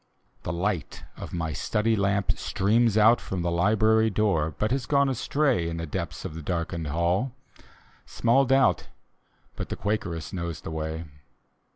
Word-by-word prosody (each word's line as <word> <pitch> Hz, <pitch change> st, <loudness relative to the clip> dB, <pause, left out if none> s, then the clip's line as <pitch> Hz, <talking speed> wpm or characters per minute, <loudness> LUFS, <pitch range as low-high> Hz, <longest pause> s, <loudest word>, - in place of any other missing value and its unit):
The -, -, -4 dB
light 90 Hz, 0 st, -2 dB
of -, -, -8 dB
my 80 Hz, -2 st, -3 dB
study 110 Hz, +7 st, 0 dB
lamp 100 Hz, -1 st, +1 dB
streams 110 Hz, +2 st, +1 dB
out 110 Hz, +2 st, +6 dB
From 90 Hz, -2 st, -4 dB
the 85 Hz, -, 0 dB
library 110 Hz, +5 st, +3 dB
door, 95 Hz, -8 st, +1 dB
but 105 Hz, +1 st, 0 dB
has 130 Hz, -1 st, -1 dB
gone 140 Hz, -1 st, +3 dB
astray 130 Hz, -, +1 dB
In 85 Hz, -, -4 dB
the 85 Hz, -, -3 dB
depths 85 Hz, +1 st, -5 dB
of 90 Hz, -, -5 dB
the 80 Hz, -, -7 dB
darkened 85 Hz, 0 st, -3 dB
hall; 85 Hz, -, 0 dB, 0.7 s
small 120 Hz, +4 st, +3 dB
doubt 135 Hz, +1 st, +3 dB, 0.7 s
But -, -, -5 dB
the -, -, -3 dB
Quakeress 100 Hz, -5 st, -3 dB
knows 85 Hz, -3 st, -4 dB
the -, -, -7 dB
way. 80 Hz, +1 st, -4 dB
95 Hz, 160 wpm, -26 LUFS, 85-110 Hz, 0.7 s, out